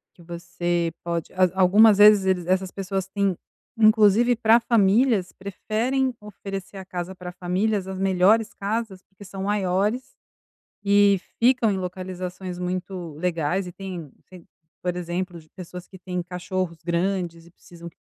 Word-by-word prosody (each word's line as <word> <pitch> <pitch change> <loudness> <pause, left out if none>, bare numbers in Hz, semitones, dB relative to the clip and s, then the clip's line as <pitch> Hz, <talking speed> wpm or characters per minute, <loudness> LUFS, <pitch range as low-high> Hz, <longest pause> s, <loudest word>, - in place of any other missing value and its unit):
que 170 - -17
você 175 0 -2
pode 170 -2 -3
al 185 -1 +3
algumas 200 +3 +6
vezes 210 -2 +7
eles 185 -2 +1
essas 185 0 0
pessoas 195 -1 -3
têm 195 -2 -1 0.4
inclusive 220 +2 +5
pra 225 0 +4
famílias 220 -2 +2
preferem 230 +7 -2
oferecer 195 -1 -8
a 190 - -8
casa 180 0 -6
pra 180 -1 -8
famílias 185 +3 -1
as 190 0 -5
melhores 195 +4 +3
casas, 205 -1 -3
porque 195 +1 -17
são 195 0 -7
maiores 205 +4 -1 0.7
e 200 -1 +4 0.2
ficam 245 -2 +4
em 195 - -1
localizações 185 0 -6
muito 180 -2 -4
legais, 175 +2 -1
e 180 - -8
têm 180 -6 -7 0.7
por 180 -1 -1
exemplo, 175 0 -4
de 155 - -22
pessoas 180 0 -10
que 190 - -13
têm 180 0 -4
cachorros 180 0 -4
grandes 170 -1 -2
e - - -17
precisam 170 -1 -13
que 165 - -21
190 Hz, 145 wpm, -24 LUFS, 180-205 Hz, 0.7 s, vezes